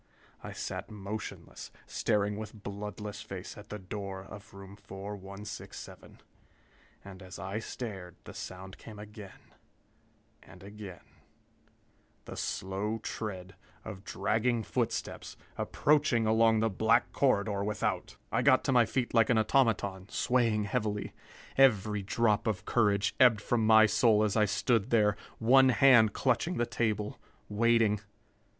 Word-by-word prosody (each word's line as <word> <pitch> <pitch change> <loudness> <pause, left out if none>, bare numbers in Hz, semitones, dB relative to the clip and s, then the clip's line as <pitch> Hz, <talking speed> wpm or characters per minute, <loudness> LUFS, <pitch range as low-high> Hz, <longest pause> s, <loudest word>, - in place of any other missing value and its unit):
I - - -6
sat - - -5
motionless, 105 +1 -7 0.2
staring 105 -2 0
with 110 0 -8
bloodless 105 +1 -6
face 95 -1 -8
at 105 0 -13
the 105 - -5
door 95 -1 -6
of 105 +1 -12
room 100 0 -11
4167. 100 0 -9 0.9
And 95 -1 -11
as 95 0 -10
I 95 +5 -4
stared, 100 -7 -7
the - - -10
sound 95 +1 -8
came 110 -2 -11
again, 105 -1 -12 0.9
and 95 0 -15
again 100 -3 -10 1.2
the - - -8
slow 100 +4 -3
tread 95 -4 -5 0.3
of 95 0 -8
dragging 115 +3 0
footsteps, 115 0 -3 0.2
approaching 145 -6 +2
along 110 0 +4
the 115 - +2
black 110 +4 +2
corridor 100 -6 +1
without! 105 -2 -2
I 115 - +1
got 130 0 +4
to 140 - 0
my 120 -3 +4
feet 125 -2 -2
like 115 -2 +4
an 120 - +4
automaton, 110 -5 +1
swaying 115 -4 +1
heavily. 105 0 -2 0.4
Every 105 -6 +4
drop 105 +2 +1
of 105 -2 -2
courage 105 -2 +2
ebbed 120 -5 +6
from 110 +1 0
my 110 0 +8
soul 110 -1 +3
as 105 -2 0
I 110 -1 +4
stood 115 +2 +1
there, 105 -3 +3 0.2
one 130 +3 +5
hand 120 -4 +6
clutching 135 +7 0
the 120 - +1
table, 105 -3 -2 0.3
waiting.... 115 -1 +3
105 Hz, 130 wpm, -30 LUFS, 100-115 Hz, 1.2 s, my